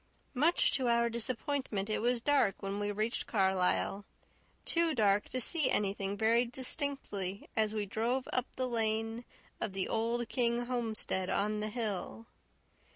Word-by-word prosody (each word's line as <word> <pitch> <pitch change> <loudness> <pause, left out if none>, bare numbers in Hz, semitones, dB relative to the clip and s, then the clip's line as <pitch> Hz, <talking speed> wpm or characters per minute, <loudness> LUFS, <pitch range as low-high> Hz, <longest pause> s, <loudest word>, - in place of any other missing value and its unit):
Much 305 +7 +3
to 260 -2 0
our 235 0 +3
disappointment 235 -2 -1
it 215 - -1
was 240 0 +1
dark 270 -11 +2
when 195 +1 -3
we 205 0 -1
reached 215 +3 -2
Carlisle 190 0 +1 0.6
too 335 -2 +1
dark 205 -3 +2
to 255 - -2
see 305 +2 +3
anything 200 0 0
very 230 +3 +4
distinctly, 245 - -2
as 220 -1 +1
we 210 -1 -1
drove 235 +6 -1
up 255 0 0
the 255 - -1
lane 225 0 0 0.3
of 200 - -3
the 190 -1 -1
old 230 +1 -1
King 240 0 0
homestead 225 -6 -1
on 210 +1 0
the 215 0 -2
hill. 220 -1 -4
225 Hz, 150 wpm, -32 LUFS, 205-245 Hz, 0.6 s, very